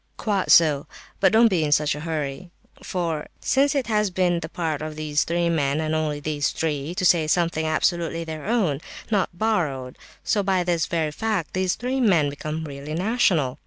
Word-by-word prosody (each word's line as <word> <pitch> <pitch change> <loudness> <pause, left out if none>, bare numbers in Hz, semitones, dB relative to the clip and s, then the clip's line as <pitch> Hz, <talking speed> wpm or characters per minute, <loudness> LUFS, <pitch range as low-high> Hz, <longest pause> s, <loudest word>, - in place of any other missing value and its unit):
"Quite 200 -4 -1
so, 150 -4 +5 0.3
but 190 -2 +4
don't 230 +1 +6
be 180 -7 +1
in 150 - -1
such 150 -1 +3
a 150 - -6
hurry! 150 0 -4 0.3
For 165 -4 -3
since 275 +2 +2
it 270 -3 0
has 210 -2 +1
been 180 -1 +1
the - - -6
part 160 -4 -3
of 155 0 -5
these 150 -1 0
three 170 0 0
men, 150 -3 +1
and 155 0 -1
only 155 -2 -1
these 145 -1 -1
three, 155 +1 -3
to 185 - -1
say 165 -3 +4
something 165 -1 +1
absolutely 165 +1 0
their 160 0 -7
own, 190 - +1 0.3
not 200 -3 +2
borrowed, 170 -10 -2 0.2
so 210 - +1
by 190 -2 +1
this 170 -3 0
very 160 -3 -1
fact 210 -1 -2
these 185 -1 0
three 255 +2 -2
men 170 - +3
become 155 +2 -5
really 145 0 -6
national. 175 - +1
165 Hz, 190 wpm, -24 LUFS, 150-185 Hz, 0.3 s, don't